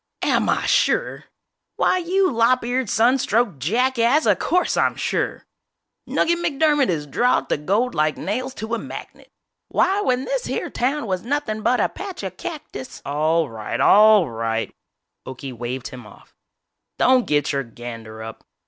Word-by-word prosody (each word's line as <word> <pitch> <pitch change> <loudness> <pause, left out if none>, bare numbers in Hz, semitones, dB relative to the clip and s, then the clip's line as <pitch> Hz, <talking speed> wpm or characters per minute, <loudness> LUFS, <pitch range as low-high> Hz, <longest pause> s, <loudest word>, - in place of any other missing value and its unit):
"Am - - +2
I - - +1
sure!! - - +1 0.5
Why 370 - +2
you 370 +2 +1
lop 235 +1 +2
eared, 245 -1 -1
sun 245 +5 +3
stroked 220 - 0
jackass, 245 - +2
of - - +3
course 360 +1 +1
I'm - - +2
sure!!! - - -2 0.6
Nugget 340 +1 +1
McDermott 300 -4 +2
is 155 -4 -1
drawed 245 - +1
to - - +1
gold 205 +12 0
like 155 0 +1
nails 255 +6 -3
to 220 +2 -5
a 235 - 0
magnet! - - -10 0.4
Why 390 +2 +1
when 255 -7 0
this - - -2
here - - -3
town 265 +2 -1
was 185 -3 -2
nothin' 240 -3 -2
but 250 +3 +2
a - - +3
patch 385 - -8
of 190 -2 -5
cactus 285 - -8
" - - -45
"All 155 +3 +1
right, 110 -3 -5
all 210 -3 +6
right," 115 -1 -3 0.5
Okie 130 0 -7
waved 120 +2 -5
him 125 -4 -11
off, 105 - -18 0.6
"don't 255 -1 +3
get 145 -1 +1
your 140 -1 0
gander 115 -2 -9
up! 110 0 -9
220 Hz, 165 wpm, -22 LUFS, -, 0.6 s, all